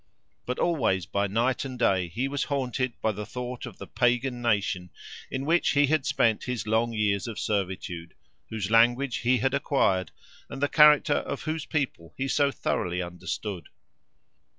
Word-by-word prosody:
But 125 - -2
always 125 - +1
by 100 +5 -1
night 115 +6 0
and 130 -2 -6
day 95 -7 +2
he 120 +11 -2
was 140 0 -2
haunted 130 -3 -1
by 110 - +3
the 105 0 -5
thought 125 +1 -6
of - - -11
the - - -8
Pagan 125 0 0
nation 100 -6 0 0.4
in 130 +1 -3
which 170 +3 +2
he 145 0 +5
had 150 0 +1
spent 115 -2 +2
his 125 -3 -3
long 110 +2 +1
years 105 -1 0
of 115 - -6
servitude, 90 -4 -3 0.3
whose 110 -2 -3
language 120 +3 +4
he 125 +1 +2
had 130 +4 0
acquired, 135 -10 +1 0.4
and - - -7
the 145 - +2
character 150 -1 +6
of 140 - -4
whose 155 -1 -3
people 130 - -3
he 135 - -1
so 140 +2 +2
thoroughly 90 -8 -2
understood. 90 +2 -5
120 Hz, 170 wpm, -27 LUFS, 100-135 Hz, 0.4 s, character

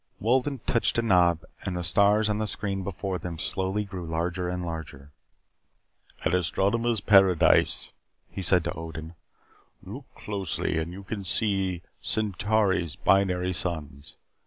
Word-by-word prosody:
Wolden 130 +3 0
touched 115 - +2
a 115 - +2
knob 90 -6 +3 0.2
and 90 -1 -3
the 90 - -3
stars 100 +5 +3
on 105 0 -1
the 110 - -1
screen 100 -2 -3
before 95 0 -4
them 85 0 -6
slowly 95 +4 -1
grew 95 -2 -7
larger 85 +2 -2
and 90 0 -3
larger. 75 -4 -7 1.1
"An - - 0
astronomer's 110 +6 +1
paradise," 95 -5 +4 0.3
he 95 - -7
said 90 -1 +3
to 85 - -3
Odin. 80 -1 -8 0.7
"Look 115 +9 -9
closely 100 -5 -2
and 80 +2 -4
you 95 +2 -9
can 100 +1 -5
see 95 -3 +2 0.2
Centauri's 105 -5 +1
binary 95 -2 +2
suns. 75 -5 -4
95 Hz, 135 wpm, -26 LUFS, 85-105 Hz, 1.1 s, paradise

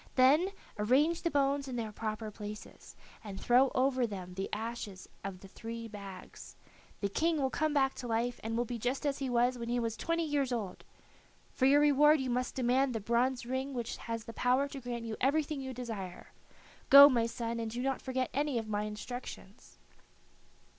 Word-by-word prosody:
Then 285 +8 +5 0.3
arrange 280 +10 +3
the 335 - 0
bones 280 -1 +1
in 255 - -5
their 225 -3 -3
proper 215 0 -4
places, 210 0 -9 0.3
and 200 -3 -7
throw 255 +2 +4
over 255 -1 +2
them 185 -4 -7
the 195 +1 -4
ashes 215 -3 -5 0.2
out 195 - -4
of 185 - -14
the 195 - -11
three 230 +3 -7
bags. 200 -3 -10 0.5
The 200 - +1
King 320 - +1
will 265 -2 0
come 310 0 0
back 270 -2 +2
to 245 - -5
life, 235 +1 -1
and 225 +1 -2
will 240 - +1
be 240 0 -5
just 250 +6 -2
as 280 -1 0
he 270 -2 -2
was 245 +1 +2
when 235 0 -4
he 245 +1 +1
was 230 -2 -2
twenty 330 +7 -1
years 285 -4 0
old. 210 -7 -4 0.7
For 260 - +3
your 285 +2 +6
reward 295 +1 +5
you 260 -2 -2
must 250 +1 -1
demand 255 0 +2
the - - 0
bronze 240 +4 0
ring 260 +2 -3
which 240 -1 -3
has 230 -1 -5
the 230 - -8
power 255 +4 +2
to 275 -1 -7
grant 240 -1 -5
you 225 -1 -4
everything 290 +1 +1
you 265 0 -5
desire. 225 -8 -6 0.6
Go, 280 +1 +12
my 235 -5 +2
son, 230 0 -4
and 225 -1 -3
do 240 +3 -4
not 270 -1 -1
forget 260 -1 -2
any 285 -1 0
of 225 -1 -3
my 210 0 -1
instructions." 210 - -8
245 Hz, 200 wpm, -32 LUFS, 225-270 Hz, 0.7 s, Go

